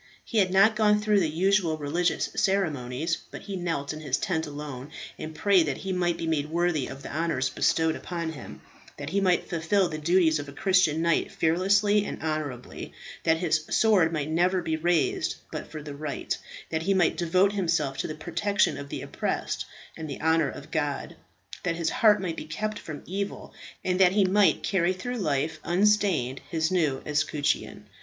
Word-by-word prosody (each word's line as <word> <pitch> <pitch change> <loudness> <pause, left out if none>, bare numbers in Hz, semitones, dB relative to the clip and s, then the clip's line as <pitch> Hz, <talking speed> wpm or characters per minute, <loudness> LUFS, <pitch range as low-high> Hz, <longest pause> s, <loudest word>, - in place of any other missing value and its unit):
He 225 - 0
had 190 -2 +3
not 195 +4 +5
gone 210 -1 +4
through 210 -1 +3
the 165 -4 +1
usual 175 0 +2
religious 155 +4 0
ceremonies, 160 -6 0
but - - -9
he 200 -1 -5
knelt 165 -5 -2
in 155 - -7
his 140 -4 0
tent 160 -4 -1
alone, 145 -2 -7 0.3
and 155 0 -6
prayed 190 -4 +4
that 140 - -2
he 190 -1 -4
might 175 -2 0
be 165 - -4
made 155 -2 -1
worthy 170 -4 0
of 135 +1 -9
the - - -7
honours 155 -5 0
bestowed 160 -1 +2
upon 170 -2 -4
him; 140 -6 -10 0.4
that 145 +1 -6
he 200 +2 +1
might 180 -2 +2
fulfil 180 +3 +1
the 155 - -5
duties 160 -1 +3
of 145 0 -6
a - - -10
Christian 185 -5 +2
knight 170 0 +1
fearlessly 200 +5 +3
and - - -5
honourably; 155 -6 -4 0.3
that 160 0 +4
his 160 -2 +1
sword 200 -7 +4
might 150 -3 -2
never 180 +3 +2
be 160 - -1
raised 170 0 +1 0.2
but - - -6
for 155 -1 -7
the 145 -1 -7
right; 145 0 -3 0.4
that 160 0 -1
he 195 +4 +1
might 180 -3 +3
devote 185 +3 +2
himself 165 -8 0
to - - -1
the 155 - -5
protection 175 -1 0
of 140 0 -8
the - - -5
oppressed, - - -3 0.3
and 160 -2 -6
the 140 - -6
honour 160 -2 +2
of 145 +4 -10
God; 145 -3 -2 0.5
that 170 -2 -1
his 165 -1 -1
heart 210 -2 +5
might 175 -4 -3
be - - -5
kept 210 +6 -3
from 155 -2 -8
evil; 200 +2 -5 0.3
and 180 0 +1
that 185 -1 +6
he 200 -1 +4
might 200 +2 +3
carry 185 -2 +1
through 245 +7 -5
life, 155 -2 -1
unstained 180 -8 +2
his 160 0 0
new 155 -7 +1
escutcheon. 150 -6 -1
165 Hz, 190 wpm, -27 LUFS, 155-190 Hz, 0.5 s, that